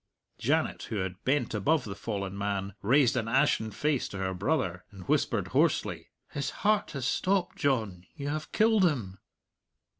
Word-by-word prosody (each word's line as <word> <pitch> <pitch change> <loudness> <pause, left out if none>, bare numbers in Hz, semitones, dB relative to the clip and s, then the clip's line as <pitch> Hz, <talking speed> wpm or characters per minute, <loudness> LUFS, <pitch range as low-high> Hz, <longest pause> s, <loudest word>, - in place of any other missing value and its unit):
Janet, - - +1
who - - -3
had 95 -1 -3
bent 135 -3 +1
above 125 +8 +2
the 100 - -5
fallen 100 -3 -4
man, 100 -1 -2
raised 125 +4 +4
an 115 -3 -1
ashen 130 -2 +2
face 145 +4 0
to 100 - -7
her 95 -1 -2
brother, 90 - -1
and 95 -3 -12
whispered - - +1
hoarsely, - - +1 0.2
"His 140 - -2 0.2
heart 210 -1 +3
has 135 -3 -3
stopped, 185 +5 0
John; 110 -10 -1
you 140 - -5
have 155 +1 -4
killed 220 -2 +4
him!" 115 - 0
115 Hz, 160 wpm, -29 LUFS, 100-150 Hz, 0.2 s, raised